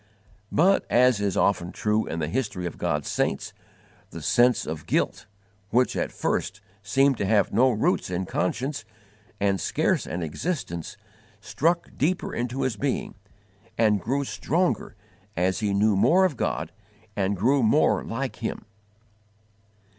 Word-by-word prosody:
But, 190 +5 +4
as 125 -3 +4
is 100 -3 0
often 90 -3 +1
true 105 +2 0
in 80 - -4
the 80 -2 -1
history 100 - -2
of 85 - -6
God's 75 -1 -1
saints, - - -1 0.6
the - - -9
sense 120 0 +3
of 80 -1 -6
guilt, - - -1 0.4
which 125 +4 +2
at - - -1
first 95 +1 -2 0.2
seemed 135 +5 +2
to - - 0
have 105 -1 +2
no 125 +5 +5
roots 125 - 0
in 90 +1 -2
conscience 125 - -2 0.6
and 100 -1 +1
scarce - - 0
an 85 +2 -3
existence, 85 - -4 0.4
struck 170 +3 -1
deeper 175 +6 -1
into 125 +2 -2
his 120 -5 -1
being 140 +2 -2 0.6
and 105 -3 +3
grew 140 +7 -1
stronger 155 - -1 0.4
as 90 +2 +1
he 105 -2 0
knew 105 +1 +3
more 165 - +4
of 175 -7 0
God - - -2 0.4
and 100 0 0
grew 130 +8 +3
more 115 +7 +3
like 130 +3 -4
Him. 115 - -4
110 Hz, 145 wpm, -25 LUFS, 95-135 Hz, 0.6 s, no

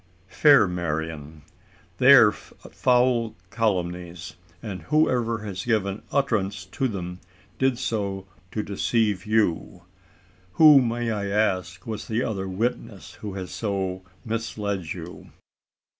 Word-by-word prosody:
"Fair 140 0 +5
Marian, 80 -3 -4 0.6
they - - +8
are - - +8
foul 125 -3 0 0.2
calumnies; 90 -6 -2 0.3
and 95 -5 -6
whoever 120 - +1
has 100 -2 -5
given 105 -4 0
utterance 105 -9 0
to 130 +8 -2
them 90 -5 -5 0.4
did 130 -2 +2
so 100 -5 -3 0.2
to 105 +3 -3
deceive 105 0 0
you. 105 -4 0 0.7
Who, 150 -4 +8
may 120 -1 -1
I 100 -2 -2
ask, 95 -3 -1
was 110 -2 -5
that 115 +3 -1
other 95 -3 -3
witness 110 +7 -4
who 100 -2 -6
has 95 -2 -6
so 95 -3 -3 0.2
misled 105 -6 -3
you!" 85 -1 -8
100 Hz, 115 wpm, -25 LUFS, 90-115 Hz, 0.7 s, they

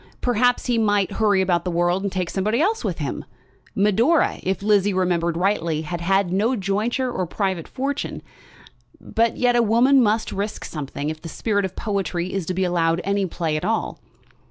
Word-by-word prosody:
Perhaps 245 0 +1
he 240 -2 +1
might 205 -3 +2
hurry 205 -2 +2
about 175 -2 +1
the 185 - -2
world 175 +2 +1
and 200 -1 -2
take 185 -2 -2
somebody 210 +5 0
else 415 +8 +1
with 190 -7 -2
him. 145 -5 -4 0.5
Medora, 225 - +2
if 190 +1 -2
Lizzie 205 -2 +3
remembered 170 -2 0
rightly, 170 -4 0
had 170 +2 -5
had 195 +1 +1
no 220 +7 +2
jointure 220 +6 -1
or 185 -7 -2
private 190 -2 -2
fortune. 275 +2 -4 0.8
But 230 0 0
yet 245 -1 +2
a 240 - +5
woman 240 +5 +4
must 220 -1 +1
risk 205 +2 -4
something 145 0 -4
if 155 0 -9
the 165 - -7
spirit 205 +2 -1
of 190 - -6
poetry 190 -4 -2
is 190 -4 -3
to 185 - -2
be 190 - 0
allowed 170 -2 +1
any 200 0 0
play 165 -2 -2
at 155 - -3
all! - - -1
195 Hz, 185 wpm, -22 LUFS, 175-225 Hz, 0.8 s, a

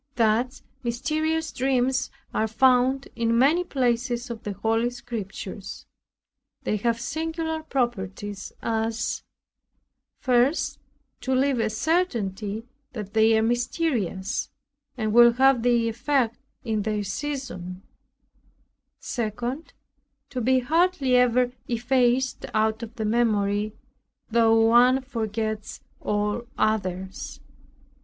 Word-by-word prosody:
Thus 235 +3 +1 0.2
mysterious 310 +6 -1
dreams 260 0 +1 0.2
are 220 - +1
found 255 +3 +3
in 230 0 +1
many 300 +8 +4
places 245 -4 -1
of 225 -1 -6
the 205 - -4
holy 225 +4 +1
Scriptures. 205 -5 -7 0.8
They 215 - 0
have 230 +2 0
singular 320 +5 -3
properties, 205 -8 -3
as 225 0 -1 1.0
1. 250 +2 +4 0.7
To 260 0 0
leave 265 -1 +2
a 220 -1 +1
certainty 220 - -1 0.3
that 210 -4 -6
they 220 0 +5
are 220 - +2
mysterious, 235 - -1 0.5
and 215 -2 -1
will 235 0 +8
have 265 0 +4
their 235 -1 +3
effect 240 0 0 0.2
in 220 -4 -1
their 210 0 -1
season. 195 -6 -5 1.2
2. 240 +5 -3 0.7
To 255 -2 -2
be 260 +2 +3
hardly 310 -2 +2
ever 250 0 +4 0.2
effaced 245 +1 +1
out 220 +1 +2
of 230 0 -7
the 220 - -3
memory, 210 -2 +1 0.6
though 225 0 +5
one 250 +3 +5
forgets 220 -4 -3 0.2
all 210 +3 -1
others. 190 -3 -2
235 Hz, 105 wpm, -25 LUFS, 215-260 Hz, 1.2 s, will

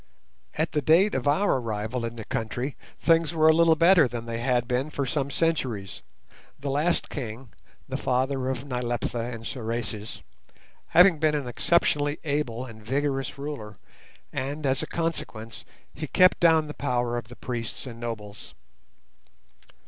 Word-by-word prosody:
At 160 +1 0
the 150 - 0
date 170 +9 +4
of 130 +1 -1
our 150 +2 +3
arrival 115 +1 -3
in 115 0 -5
the 110 -2 -7
country 120 +5 -3 0.2
things 165 -1 +3
were 155 -1 +5
a 160 - +8
little 165 0 +5
better 165 -2 +6
than 120 -1 -5
they 115 0 -4
had 120 -1 +1
been 125 +4 0
for 140 -2 -2
some 140 0 -1
centuries, 130 - -1 0.6
the 140 0 -3
last 155 +5 +1
king, 120 -2 -6 0.4
the - - -3
father 130 +1 0
of 130 +1 -3
Nyleptha 120 -2 -2
and 115 -1 -6
Sorais, 115 -3 -4 0.6
having 180 -2 +6
been 155 -1 +2
an 145 -4 -2
exceptionally 145 +2 +2
able 140 -5 -1
and 110 -3 -12
vigorous 135 +3 -1
ruler, 140 -8 -6 0.6
and, 145 +3 -3
as 130 -1 +2
a - - -3
consequence, 120 -9 -4 0.3
he 155 +3 -5
kept 185 +5 +5
down 160 -2 +5
the 150 - -7
power 120 -4 -1
of 120 -2 -4
the 120 - -11
priests 120 -2 -5
and 120 -3 -8
nobles. 110 -3 -7
130 Hz, 155 wpm, -26 LUFS, 115-150 Hz, 0.6 s, a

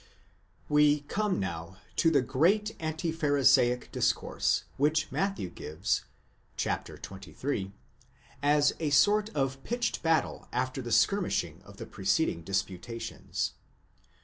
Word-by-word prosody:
% - - -26 0.6
We 150 0 +4
come 200 +7 -1
now 85 -1 -5 0.2
to 165 - +4
the 140 -5 +3
great 185 - +2
anti 160 +1 -2
pharisaic 140 -5 +3
discourse, - - +1
which 155 +2 +1
Matthew 195 - -1
gives 90 +6 -2 0.5
{xxiil.) 100 +2 -4 0.7
as 145 0 +4
a 155 - 0
sort 205 +9 +4
of 135 -1 -1
pitched 240 0 -1
battle 165 -1 0
after 130 +2 -2
the 120 -1 -6
skirmishing 115 - +1
of - - -15
the - - -6
preceding 85 - 0
dis 95 +4 0
putations. 115 +5 -5
145 Hz, 120 wpm, -29 LUFS, 110-160 Hz, 0.7 s, We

